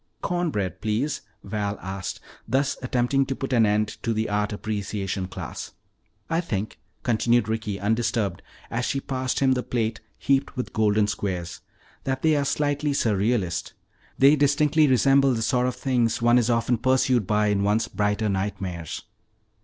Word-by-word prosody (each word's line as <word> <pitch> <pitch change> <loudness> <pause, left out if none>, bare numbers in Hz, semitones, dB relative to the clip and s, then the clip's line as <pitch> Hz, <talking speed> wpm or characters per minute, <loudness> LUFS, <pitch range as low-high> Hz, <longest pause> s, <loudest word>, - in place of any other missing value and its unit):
'" - - -44
"Corn 175 -1 0
bread, 95 -7 -3
please," 110 +7 -1 0.2
Val 105 -1 -3
asked, 95 0 -5 0.3
thus 135 +4 +1
attempting 125 +2 +1
to 135 - -2
put 135 -1 -4
an 115 -3 +5
end 105 0 0
to 115 - 0
the 110 0 -1
art 105 +1 0
appreciation 100 -2 -3
class. 95 - -7 0.5
"I 165 +1 +1
think," 110 - -4 0.2
continued 120 -1 +2
Ricky, 110 -2 -2
undisturbed 110 -2 0 0.3
as 120 +1 -1
she 135 - 0
passed 130 -1 -2
him 135 -1 +4
the 125 -1 +2
plate 115 -2 -2 0.2
heaped 135 0 0
with 125 - -4
golden 105 -1 +3
squares, 90 -5 -3 0.4
"that 130 -1 -2
they 160 -1 +4
are 140 -1 +1
slightly 145 +1 0
surrealist. 100 -6 0 0.4
They 140 +3 +6
distinctly 150 +1 +3
resemble 135 0 +4
the 115 - -1
sort 125 +1 +2
of 125 - -2
things 120 -4 +1
one 120 +1 +5
is 120 0 0
often 115 0 +1
pursued 130 -4 +2
by 105 0 +2
in 100 -1 +1
one's 105 +3 +1
brighter 105 +1 0
nightmares." 95 -4 -3
115 Hz, 160 wpm, -25 LUFS, 105-130 Hz, 0.5 s, They